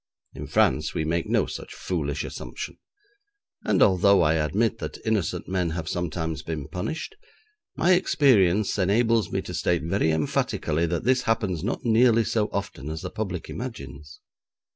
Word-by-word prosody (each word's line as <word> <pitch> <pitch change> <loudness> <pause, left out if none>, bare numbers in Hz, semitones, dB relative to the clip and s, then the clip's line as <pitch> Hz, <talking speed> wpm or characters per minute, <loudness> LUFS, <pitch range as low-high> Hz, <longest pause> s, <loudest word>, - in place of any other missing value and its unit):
In - - -7
France - - +2
we 80 - -1
make 85 +2 -1
no - - +2
such - - -8
foolish 75 -5 -2
assumption, - - -7 0.8
and - - +3
although 100 0 +5
I 75 0 +3
admit 105 +9 0
that - - -5
innocent 110 -6 -1
men 90 -2 0
have 80 -1 -4
sometimes 80 -2 -3
been 75 -3 -5
punished, 130 - -5 0.6
my 175 - +2
experience 110 - +3
enables 110 +4 +2
me 95 - -1
to 90 - -7
state 85 0 0
very 85 0 +1
emphatically 80 +1 0
that 85 0 -2
this 130 +1 +3
happens 95 -7 0
not 120 +4 -3
nearly 115 0 +4
so 110 -2 0
often 95 -8 -4
as 80 0 -5
the - - -5
public 95 -6 -4
imagines. 75 - -8
90 Hz, 155 wpm, -25 LUFS, 80-110 Hz, 0.8 s, although